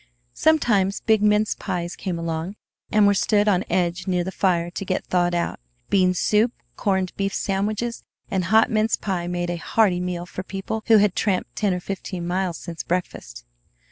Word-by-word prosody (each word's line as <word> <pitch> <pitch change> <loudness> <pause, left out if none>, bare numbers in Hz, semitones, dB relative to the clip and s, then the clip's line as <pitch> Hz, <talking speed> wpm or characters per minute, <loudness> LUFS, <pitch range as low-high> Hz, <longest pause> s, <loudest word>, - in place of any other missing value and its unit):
Sometimes 210 -11 +2
big 220 -2 +3
mince 210 0 +3
pies 175 -3 -4
came 185 -3 -4
along, 165 +3 -3 0.4
and 210 -1 +5
were 200 - +5
stood 205 +2 +2
on 190 -3 +3
edge 180 +1 0
near 180 -1 +1
the 190 - -4
fire 175 -3 +1
to 185 - -5
get 185 -1 -2
thawed 175 -1 +1
out. 170 - -2 0.3
Bean 185 -2 +3
soup, 215 +5 +2 0.2
corned 190 -2 -1
beef 195 0 0
sandwiches, 210 +4 -2 0.3
and 185 -2 0
hot 220 +4 +4
mince 220 0 +2
pie 180 -4 -3
made 175 0 -2
a 175 - -3
hearty 185 0 +2
meal 180 -1 -3
for 180 - -6
people 195 +3 -4
who 225 - +7
had 205 -2 +3
tramped 195 -4 -1
ten 205 -2 +1
or 180 - -1
fifteen 185 -1 -5
miles 180 -1 -1
since 170 -2 -6
breakfast. 115 - -4
190 Hz, 180 wpm, -23 LUFS, 175-210 Hz, 0.4 s, who